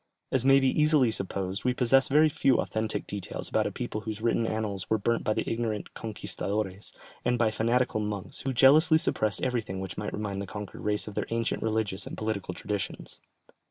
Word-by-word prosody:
As 130 -2 +2
may 135 +1 +6
be 135 - +2
easily 150 -6 +4
supposed, 95 -1 -3
we 125 -1 +1
possess 135 +2 +4
very 150 +3 +5
few 135 -3 +2
authentic 110 0 -2
details 100 -2 -5
about - - +1
a - - -4
people 105 - -4
whose 110 0 -5
written 115 0 +1
annals 105 -4 -3
were 110 - +3
burnt 115 +3 0
by 110 - +1
the 110 - -2
ignorant 115 -3 -2
"conquistadores" 105 -2 -4 0.3
and 125 0 +2
by 115 -2 +2
fanatical 115 +1 +1
monks, 105 -2 -4
who 135 - -2
jealously 145 +6 +6
suppressed 110 -9 0
everything 115 -7 -1
which 95 -2 -5
might 105 - -3
remind 100 -2 -3
the 100 - -5
conquered 105 0 -7
race 105 0 -1
of 105 - -6
their - - -2
ancient 115 0 -1
religious 110 -3 -1
and - - -7
political 105 -4 -3
traditions. 105 -3 -5
110 Hz, 195 wpm, -28 LUFS, 105-125 Hz, 0.3 s, may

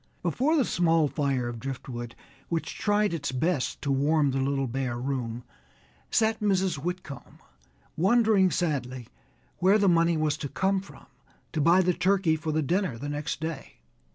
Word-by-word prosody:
Before 255 - +1
the 280 -6 +3
small 165 -3 +2
fire 135 -3 -1
of 120 -1 -5
driftwood, 125 -2 -6 0.3
which 165 -1 -3
tried 205 -2 +1
its 145 -5 -3
best 140 +2 -1
to 140 - 0
warm 145 +1 +2
the 135 - -1
little 135 0 0
bare 125 -1 -3
room, 125 -2 -3 0.7
sat 220 0 +2
Mrs. 190 -6 +1
Whitcomb, 175 -2 -6 0.6
wondering 205 +1 +4
sadly 130 -9 -2 0.5
where 190 +4 +5
the 200 -2 +2
money 170 -1 +3
was 155 -1 0
to 140 - -5
come 190 +4 0
from 195 - -15 0.5
to 155 - 0
buy 170 +5 +5
the 180 0 +2
turkey 180 -2 +2
for 160 0 -3
the 155 0 0
dinner 175 - 0
the 145 +5 -5
next 150 +2 -4
day. 160 -4 -5
155 Hz, 160 wpm, -27 LUFS, 135-185 Hz, 0.7 s, where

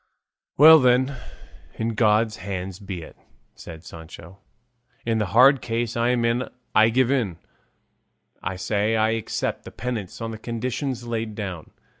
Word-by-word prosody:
"Well 160 +2 +9
then, 130 +1 +3 0.6
in 115 +1 -2
God's 110 -1 +2
hands 95 0 -5
be 95 -4 -6
it," - - -13 0.4
said 80 -1 -11
Sancho; 85 +2 -12 0.7
"in 115 -1 0
the 105 - 0
hard 130 +7 +5
case 115 0 -2
I'm 120 0 +1
in 120 +2 0 0.2
I 110 +1 +5
give 130 +2 +2
in; 110 -11 0 1.0
I 90 +2 -3
say 105 +3 0
I 110 0 +2
accept 115 -1 -3
the - - -9
penance 115 -7 -5
on 115 -1 -4
the 110 - -8
conditions 125 +2 -4
laid 115 -2 -3
down." 95 -7 -6
115 Hz, 145 wpm, -24 LUFS, 100-120 Hz, 1.0 s, Well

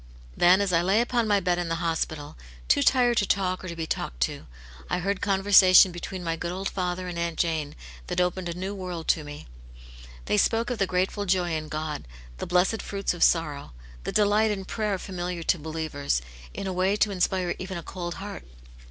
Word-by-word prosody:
Then 180 +3 +5
as 195 -3 0
I 165 - +4
lay 190 +5 +3
upon 240 -1 +1
my 205 -1 +3
bed 180 -2 0
in 175 -1 -2
the 165 - 0
hospital, 160 -3 -3 0.3
too 105 - +4
tired 245 - +4
to 205 - +2
talk 185 -2 0
or - - -6
to 170 - -5
be 165 -1 -3
talked - - -4
to, - - -1 0.4
I - - 0
heard 195 +2 -2
conversation 190 -2 +6
between 180 +1 -6
my 165 -1 -1
good 170 +1 -4
old 190 +2 -3
father 180 -1 -3
and 175 -1 -4
Aunt 170 -1 -2
Jane, 160 -4 -1 0.3
that - - -2
opened 180 0 0
a 170 - -4
new 190 +3 -4
world 180 -4 -6
to 155 - +3
me. 145 0 -9 0.8
They 105 - +1
spoke 230 - +2
of 240 - -3
the 195 - +2
grateful 190 +3 -1
joy 180 -2 +1
in 155 -1 -3
God, 155 - -4 0.3
the - - -4
blessed 180 +5 +2
fruits 200 -2 -2
of 175 - -9
sorrow, 150 - +1 0.3
the - - -3
delight 210 +1 +3
in 195 -2 -3
prayer 210 -1 -1
familiar 180 -2 -5
to 170 - +1
believers, 150 - -2 0.3
in - - -6
a 190 - -2
way 185 +2 +2
to 210 0 +2
inspire 185 -1 0
even 185 0 -5
a 170 - -6
cold 175 0 -5
heart. 205 +1 -7
180 Hz, 210 wpm, -26 LUFS, 165-195 Hz, 0.8 s, conversation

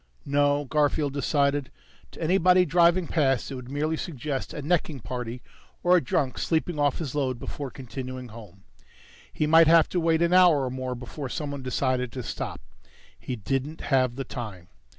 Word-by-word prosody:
No, 145 0 +2
Garfield 145 0 +1
decided. 140 -1 +1 0.4
To - - -11
anybody 180 +1 +4
driving 175 +1 +4
past 135 -6 +1
it - - -4
would 125 -1 -8
merely 150 +3 -1
suggest 145 -4 -4
a 150 - -6
necking 155 -2 0
party, 120 +1 -6 0.4
or 180 +1 +5
a 175 - +3
drunk 130 +1 -1
sleeping 160 -1 -1
off 145 -2 +2
his 150 -6 -4
load 135 -4 -1
before 135 +2 -6
continuing 130 -1 -7
home. 105 -4 -13 0.7
He 155 - -1
might 160 +1 +6
have 165 0 +6
to 180 - 0
wait 165 0 +2
an 170 +1 +2
hour 175 -7 +6
or 125 - -3
more 130 -1 -4
before 130 +3 -7
someone 145 -2 -4
decided 130 -1 -1
to 130 - -5
stop. - - -5 0.6
He 130 - -4
didn't 135 +7 -3
have 130 -2 +3
the 135 - -3
time. 105 -9 -7
140 Hz, 170 wpm, -26 LUFS, 130-160 Hz, 0.7 s, might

